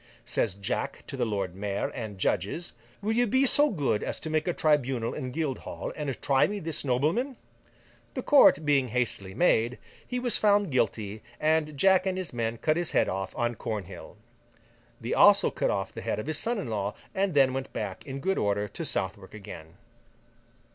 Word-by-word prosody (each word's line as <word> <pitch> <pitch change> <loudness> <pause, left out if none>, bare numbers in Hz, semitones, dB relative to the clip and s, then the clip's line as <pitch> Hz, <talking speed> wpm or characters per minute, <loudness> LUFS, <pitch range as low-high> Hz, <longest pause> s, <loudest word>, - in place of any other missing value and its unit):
Says 105 -5 0
Jack 100 -1 -3
to - - -6
the - - 0
Lord 100 -4 -2
Mayor 100 +1 -2
and 110 -5 -6
judges: 100 - -1 0.3
'Will 215 - 0
you 240 +2 +2
be 260 +6 +3
so 290 +3 +5
good 140 - 0
as - - -2
to 155 - -4
make 155 +1 0
a - - +3
tribunal 135 -8 +1
in 130 -4 -4
Guildhall, 145 -1 -4
and 140 -4 -4
try 135 -2 +4
me 205 - -4
this 165 -4 -1
nobleman?' 155 - 0 0.8
The - - -3
court 215 - +6
being 140 -3 +3
hastily 105 -5 -2
made, 120 -8 +2 0.3
he 250 - -3
was 245 -3 +2
found 205 -4 +3
guilty, 110 -4 -1 0.2
and 155 -1 +1
Jack 190 +4 +4
and 185 -1 -1
his 185 -6 -4
men 115 -1 -2
cut 155 +6 +1
his 175 -2 -1
head - - +3
off 95 0 -4
on 120 -1 0
Cornhill. 105 -6 -6 0.8
They - - -3
also - - +6
cut - - 0
off - - -2
the - - -7
head - - -2
of 105 - -4
his 155 0 -1
son 235 +1 -1
in 200 - -4
law, 105 -2 -2 0.2
and 190 -4 0
then 135 -2 +5
went 135 0 -4
back 100 -3 -5
in 135 0 -6
good 190 +5 0
order 105 0 0
to - - -6
Southwark 95 +1 -3
again. 80 -5 -10
135 Hz, 190 wpm, -28 LUFS, 105-170 Hz, 0.8 s, court